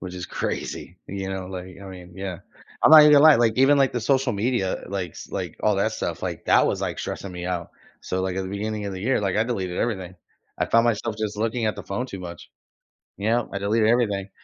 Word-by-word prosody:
Which 90 -1 -7
is 90 - -5
crazy, 90 - -4
you 95 0 -5
know? 95 -1 -5
Like, 90 -1 -8
I - - -9
mean 90 -2 -11
yeah, 95 -2 -5 0.4
I'm - - +6
not 155 -1 +11
even 150 0 +7
gonna 145 -1 +7
lie, 155 -2 +9
like, 115 -2 +2
even, 135 +2 +5
like, 135 -1 +3
the 120 - -2
social 130 +1 +1
media 105 -2 -1
likes 95 -4 -5
like, - - -4
all - - +3
that - - +1
stuff, - - -4
like, - - -5
that - - +5
was, - - -1
like, - - -3
stressing 100 - -5
me 90 0 -6
out. 90 -2 -3 0.3
So, 95 - -3
like, 95 -1 -2
at 95 - -1
the 95 - -5
beginning 105 +2 -3
of 100 - -4
the 95 - -6
year, 125 +5 +1
like, 100 -2 -1
I 110 - +3
deleted 95 -7 -3
everything. 95 -6 -2 0.4
I - - +1
found 115 0 +4
myself 115 -1 -1
just 105 -1 -3
looking 115 +2 -1
at 110 - -1
the - - -8
phone 120 +6 -3
too 100 -7 -8
much, 85 -2 -9 0.7
you 100 - -3
know? 120 +1 +1
I - - -2
deleted 110 +2 +2
everything. 105 -5 +1
100 Hz, 245 wpm, -24 LUFS, 95-115 Hz, 0.7 s, not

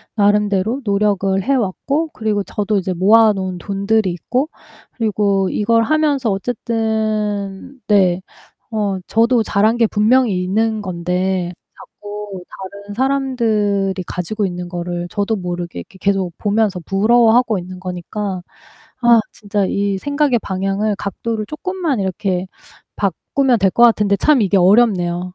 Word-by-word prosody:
나름대로 210 +3 +2
노력을 200 -2 +1
해 275 +6 +1
왔고 275 - -1
그리고 210 -2 -1
저도 210 +1 -1
이제 185 -1 -1
모아 215 +4 +5
놓은 185 -2 -4
돈들이 200 +1 0
있고 255 - -2 0.5
그리고 205 -4 +1
이걸 230 +2 +2
하면서 290 -4 +1
어쨌든 215 +1 -2
네 190 -3 +3 0.5
어 200 -3 0
저도 230 +1 +2
잘한 215 +4 +2
게 230 - +4
분명히 215 -2 +2
있는 215 +3 0
건데 180 0 -2 0.2
자꾸 205 -3 -9
다른 200 +1 -9
사람들이 225 -8 0
가지고 200 +4 -2
있는 180 0 -5
거를 175 0 -4
저도 205 +2 0
모르게 175 -2 -5
이렇게 190 - -16
계속 195 -3 0
보면서 205 -3 +1
부러워하고 225 +3 +3
있는 180 +1 -9
거니까 185 +1 -4 0.6
아 235 -1 +6
진짜 205 -1 -2
이 200 0 -1
생각의 285 -1 +1
방향을, 195 +2 -1
각도를 215 +2 -4
쪼끔만 330 - -3
이렇게 190 -1 -2 0.5
바꾸면 240 - 0
될 190 -1 +3
것 235 - +2
같은데 210 -4 +5
참 290 +4 +3
이게 200 -1 +2
어렵네요. 180 -3 +3
205 Hz, 290 characters per minute, -18 LUFS, 190-225 Hz, 0.6 s, 아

